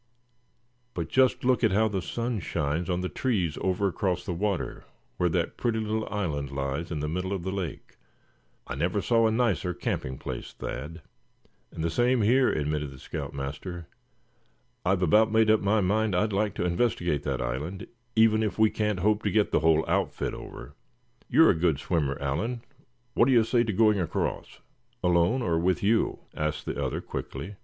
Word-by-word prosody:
But 85 -2 -3
just 130 -1 +3
look 125 -2 +3
how 110 +4 +3
the 100 -3 -2
sun 115 +5 -2
shines 80 0 -2
on 90 0 0
the 90 - -1
trees 95 - -1
over 95 +1 +1
across 90 -1 -1
the 90 - -2
water, 100 +2 -2 0.3
where 90 - +2
that - - -1
pretty 115 -2 0
little 110 0 -2
island 80 -9 -2
lies 70 +4 -3
in 80 -4 -3
the 75 - -2
middle 90 +4 -3
of 95 -3 -2
the 95 - -2
lake. 95 -6 -5 0.7
I - - -5
never - - 0
saw 115 -1 +3
a - - +1
nicer 110 -6 0
camping 65 -6 -3
place, - - -6
Thad." 75 +4 -6 0.7
"And 80 - -5
the 85 - 0
same 120 +4 +2
here," 125 +5 +4
admitted 75 -1 -1
the 70 - -12
scout - - -6
master. 75 +6 -5 1.0
"I've 95 0 +1
about 110 +6 +4
made 110 -1 +4
up 110 - +4
my 105 +2 +2
mind 105 +1 +1
I'd 105 +3 +1
like 105 0 0
to - - -1
investigate 85 - 0
that 70 -3 -2
island, 65 +10 -4 0.3
even 110 -1 +5
if 105 -2 -1
we 110 -1 +4
can't 105 -4 -1
hope 105 +2 +2
to 105 - 0
get 105 +1 +2
the - - +3
whole 80 0 +3
outfit - - -1
over. - - -9 0.6
You're 160 - +6
a - - +2
good 80 -3 +1
swimmer, 75 -3 -1
Allan, 110 - -2 0.5
what - - +4
do 135 - +4
you 115 -2 +6
say 120 +1 +2
to 110 - -1
going 105 0 +3
across?" 85 -3 -3 0.4
"Alone, 90 +8 +3
or 85 -4 +1
with 90 +3 +1
you?" 110 +3 +1
asked 75 0 -2
the - - -3
other, - - -2
quickly. 100 - -6
95 Hz, 185 wpm, -27 LUFS, 80-110 Hz, 1.0 s, You're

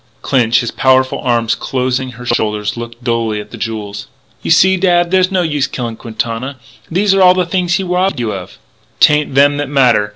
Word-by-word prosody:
Clinch, 120 -2 +2
his 120 - -4
powerful 130 0 +2
arm 120 -2 0
closing 130 +2 -2
her 120 +1 -11
shoulders, 105 -3 -1
looked 120 0 -9
dully 115 -3 -1
at 105 - -10
the - - -8
jewels. 105 -2 -5 0.3
"You - - -5
see, 190 +3 +5
dad, 175 -2 +2
there's 185 -1 +3
no 185 -2 +1
use 150 -4 -1
killing 120 -3 -5
Quintana. 115 +3 -5 0.3
These 195 +4 +2
are 185 -2 +6
the 180 -1 +1
things 175 0 0
he 195 - -1
robbed 180 -2 0
you 115 -3 -2
of." 95 -2 -8 0.4
"'Tain't 150 -2 +3
them 145 +1 +4
that 145 -2 -3
matter.... 125 -7 +3
130 Hz, 190 wpm, -15 LUFS, 115-175 Hz, 0.4 s, are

